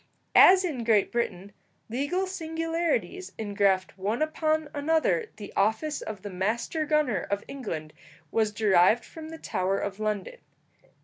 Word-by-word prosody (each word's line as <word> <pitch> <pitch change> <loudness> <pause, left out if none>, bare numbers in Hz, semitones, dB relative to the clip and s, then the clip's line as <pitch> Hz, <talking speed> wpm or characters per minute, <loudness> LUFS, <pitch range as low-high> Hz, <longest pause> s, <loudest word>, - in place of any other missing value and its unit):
As 375 0 +8
in 275 -9 -3
Great 220 -3 +3
Britain 205 -5 -2 0.4
legal 285 +11 -1
singularities 330 +1 -2
engraft 200 -3 0
one 210 +9 0
upon 310 0 0
another 320 +10 +1
the 205 - -9
office 220 +10 +1
of 210 -4 -7
the 205 - -5
master 225 - -1
gunner 300 -8 +2
of 200 0 -1
England 165 - -6 0.4
was 220 -2 +1
derived 205 +1 +4
from 315 -1 -10
the 325 - -8
Tower 190 -9 -1
of 200 0 -4
London. 210 -3 -3
235 Hz, 135 wpm, -27 LUFS, 200-315 Hz, 0.4 s, As